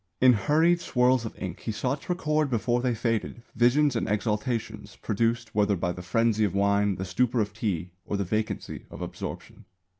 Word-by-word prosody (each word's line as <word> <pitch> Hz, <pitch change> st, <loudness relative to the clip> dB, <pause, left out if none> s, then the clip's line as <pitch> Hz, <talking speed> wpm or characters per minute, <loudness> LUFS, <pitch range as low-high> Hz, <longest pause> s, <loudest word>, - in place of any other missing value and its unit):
In 130 Hz, -1 st, +7 dB
hurried 160 Hz, -, +3 dB
swirls 125 Hz, -5 st, +2 dB
of 110 Hz, -, -7 dB
ink 95 Hz, -2 st, -5 dB
he 115 Hz, -, -4 dB
sought 130 Hz, +6 st, -2 dB
to -, -, -5 dB
record 155 Hz, -4 st, 0 dB
before 120 Hz, 0 st, +1 dB
they 125 Hz, -2 st, 0 dB
faded 115 Hz, 0 st, -2 dB
visions 125 Hz, +4 st, +3 dB
and 115 Hz, -, -1 dB
exaltations 105 Hz, +2 st, -2 dB
produced 115 Hz, +1 st, -1 dB
whether 105 Hz, -1 st, +2 dB
by 85 Hz, 0 st, -1 dB
the 90 Hz, -, -7 dB
frenzy 110 Hz, +4 st, +1 dB
of 100 Hz, -, 0 dB
wine, 100 Hz, 0 st, +2 dB
the 95 Hz, -, -4 dB
stupor 120 Hz, +6 st, +1 dB
of 105 Hz, -1 st, -1 dB
tea, 95 Hz, -5 st, -2 dB
or 100 Hz, -, -3 dB
the 100 Hz, -, 0 dB
vacancy 105 Hz, +3 st, -3 dB
of -, -, -7 dB
absorption. -, -, -7 dB
115 Hz, 185 wpm, -27 LUFS, 100-125 Hz, -, In